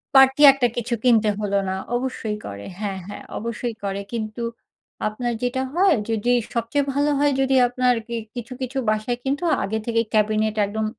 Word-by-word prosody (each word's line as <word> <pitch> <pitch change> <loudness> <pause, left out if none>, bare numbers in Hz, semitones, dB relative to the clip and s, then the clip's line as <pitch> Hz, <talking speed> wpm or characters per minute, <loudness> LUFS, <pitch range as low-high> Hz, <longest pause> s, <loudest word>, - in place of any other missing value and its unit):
Party 270 +1 +6
একটা 255 -3 +2
কিছু 240 0 -2
কিনতে 225 -4 +4
হলো 200 -1 0
না। 190 - -1 0.2
অবশ্যই 240 -4 -2
করে 100 0 -7
হ্যাঁ, 195 -3 -3
হ্যাঁ। 205 - -8
অবশ্যই 235 +1 -4
করে, 200 0 -2
কিন্তু 215 0 -4 0.7
আপনার 240 +3 -2
যেটা 250 +1 0
হয় 365 -2 +4
যদি 225 +2 +1 0.2
সবচেয়ে 240 +5 0
ভালো 290 +1 +2
হয় 290 0 +3
যদি 270 0 +2
আপনার 250 0 +2 0.4
কিছু, 240 +1 -6
কিছু 260 +1 -3
বাসায় 215 +3 0
কিন্তু 275 +4 -1 0.2
আগে 220 +3 -1
থেকেই 230 -1 +1
ক্যাবিনেট 215 0 +2
একদম 215 +2 -2
235 Hz, 165 wpm, -23 LUFS, 215-260 Hz, 0.7 s, Party